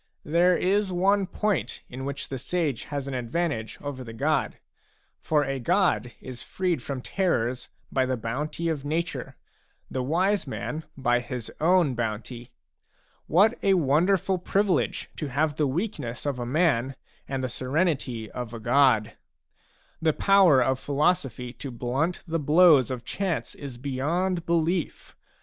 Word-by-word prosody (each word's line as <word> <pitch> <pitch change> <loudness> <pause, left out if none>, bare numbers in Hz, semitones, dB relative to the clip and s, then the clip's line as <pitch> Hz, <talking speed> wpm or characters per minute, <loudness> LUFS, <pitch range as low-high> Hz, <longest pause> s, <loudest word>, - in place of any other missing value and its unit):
There 175 +3 +4
is 195 +1 +1
one 195 +2 +2
point 190 - -1
in 130 +2 -7
which 140 0 -4
the 135 - -4
sage 150 -2 -1
has 140 -1 -4
an 140 - -4
advantage 125 -1 -2
over 140 -3 -5
the 115 -2 -9
god; 150 +7 0 0.6
for 150 -2 +1
a 135 -1 -2
god 175 - +1
is 130 -2 -8
freed 180 -7 -1
from 135 0 -5
terrors 125 -10 -1 0.2
by 130 -1 +1
the 130 -1 -1
bounty 140 +9 -3
of 155 -4 -1
nature, 165 +4 -3 0.6
the 130 - -1
wise 180 +7 +1
man 155 +4 -4
by 120 -2 +2
his 120 -1 -6
own 170 -4 +4
bounty. 120 +1 -4 0.8
What 200 +7 +5
a 195 -1 +4
wonderful 180 +5 +2
privilege, 195 +1 0
to 150 - -3
have 145 +3 0
the 150 - +2
weaknesses 135 - -3
of 140 -3 -1
a 120 - -3
man 135 -3 +1 0.3
and 135 -1 -3
the - - 0
serenity 130 -3 -1
of 120 -2 -6
a - - -6
god! 115 -3 +3 0.9
The 160 -1 +3
power 190 -9 +5
of 130 +1 0
philosophy 140 -5 0
to 140 - -7
blunt 130 +8 -2
the 165 0 -1
blows 150 -3 +6
of 125 -2 -5
chance 190 -5 -2
is 135 -4 -8
beyond 165 +7 -1
belief. 170 +1 -1
145 Hz, 150 wpm, -26 LUFS, 125-175 Hz, 0.9 s, blows